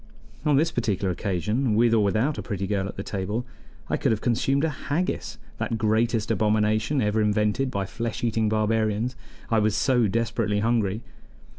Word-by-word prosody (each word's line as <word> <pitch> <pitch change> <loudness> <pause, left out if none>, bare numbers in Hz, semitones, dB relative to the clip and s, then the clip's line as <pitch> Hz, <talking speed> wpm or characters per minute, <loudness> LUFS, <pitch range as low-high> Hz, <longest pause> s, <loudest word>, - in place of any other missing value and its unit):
On 150 -2 +4
this 160 +4 +3
particular 100 - 0
occasion, 105 +6 -1
with 115 +1 +4
or 110 -2 +4
without 110 +9 +1
a - - -2
pretty 100 -3 -3
girl 95 -1 -1
at - - -7
the 100 - -5
table, 105 +5 -3 0.4
I - - 0
could - - +1
have 110 - +1
consumed 130 +5 +1
a 160 - +2 0.2
haggis 145 -7 -1 0.2
that 110 +1 -1
greatest 110 0 +1
abomination 110 +5 +1
ever 105 +1 +1
invented 105 +5 +1
by 100 -5 -2
flesh 115 +4 -4
eating 110 -2 +1
barbarians 110 +2 0 0.4
I 115 - +4
was 105 0 +1
so 120 +1 +3
desperately 115 -1 0
hungry. 110 -1 0
110 Hz, 170 wpm, -25 LUFS, 105-120 Hz, 0.4 s, On